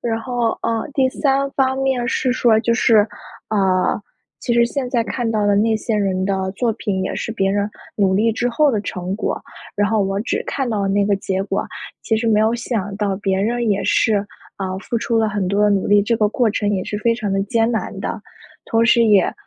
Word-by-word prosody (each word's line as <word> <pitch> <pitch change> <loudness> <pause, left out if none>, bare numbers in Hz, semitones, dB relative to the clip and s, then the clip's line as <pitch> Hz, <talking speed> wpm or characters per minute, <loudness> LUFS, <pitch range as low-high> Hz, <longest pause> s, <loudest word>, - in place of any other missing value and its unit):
然 225 -1 -2
后， 240 0 -1
呃， 225 -1 -1
第 265 -2 +3
三 275 0 0
方 265 -1 +1
面 265 -3 0
是 255 +1 +1
说 235 -3 +3
就 235 +1 +1
是， 230 -2 +4 0.5
呃， 190 -1 +1 0.4
其 240 - -1
实 235 0 +5
现 255 +1 -3
在 235 -3 +1
看 240 -1 -2
到 215 -2 0
的 205 -1 +3
那 220 +1 +2
些 215 0 -2
人 190 -2 0
的 190 -1 -1
作 235 +2 0
品， 195 -5 -2
也 - - -3
是 225 - -4
别 195 -3 0
人 205 +1 0 0.3
努 195 -2 +2
力 225 +3 +3
之 245 +2 -1
后 290 +5 +3
的 215 -5 0
成 185 -1 -4
果， - - -3 0.3
然 205 +1 +1
后 215 -2 +2
我 195 +1 -1
只 225 - -2
看 270 -3 -2
到 215 -3 -1
了 - - 0
那 200 +1 +2
个 200 -1 +2
结 190 0 -2
果， 200 - -2 0.4
其 220 - +1
实 230 +1 -2
没 215 -1 +3
有 220 +2 +2
想 215 -4 -3
到 200 -2 -1
别 195 -1 -1
人 235 +2 0
也 200 -1 +1
是， 220 -2 +3 0.4
呃， 190 -1 -3
付 235 - -4
出 230 0 0
了 220 -1 +2
很 200 -2 -2
多 200 +2 +1
的 210 - +4
努 200 -2 +1
力， 205 0 +5
这 230 +2 +1
个 210 -1 +2
过 235 +1 +1
程 205 -1 -1
也 185 -2 -1
是 210 - -4
非 230 +2 +2
常 210 -4 -3
地 195 0 +1
艰 230 0 +1
难 220 - -3
的。 - - -4 0.4
同 225 0 +2
时 235 0 +5
也 205 -4 +4
215 Hz, 250 characters per minute, -20 LUFS, 200-235 Hz, 0.5 s, 实